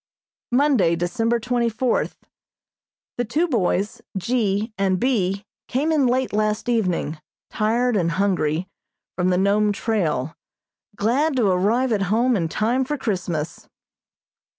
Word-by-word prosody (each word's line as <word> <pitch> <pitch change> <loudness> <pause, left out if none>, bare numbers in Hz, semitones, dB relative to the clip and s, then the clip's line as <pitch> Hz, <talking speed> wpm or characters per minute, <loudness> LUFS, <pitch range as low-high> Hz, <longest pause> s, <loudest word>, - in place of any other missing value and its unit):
Monday, 245 - +3
December 225 +7 0
twenty 240 0 0
fourth: 235 +2 -1 1.0
The - - +2
two 300 +10 0
boys, 205 - 0 0.2
G. 215 +1 0
and 190 -2 +1
B., 200 -5 0 0.2
came 285 +6 0
in 290 -5 +3
late 255 0 0
last 215 +1 0
evening, 180 -9 0 0.3
tired 230 +3 +1
and 170 -4 +1
hungry, 180 -3 0 0.5
from 180 0 +1
the 180 - +2
Nome 205 +2 +3
trail, 165 - -1 0.6
glad 265 +9 +1
to 245 -4 +2
arrive 225 +8 +2
at 210 -3 +1
home 240 +4 +3
in 165 -5 -1
time 235 +9 +1
for 295 +3 -3
Christmas. 175 - -3
215 Hz, 130 wpm, -22 LUFS, 185-245 Hz, 1.0 s, Monday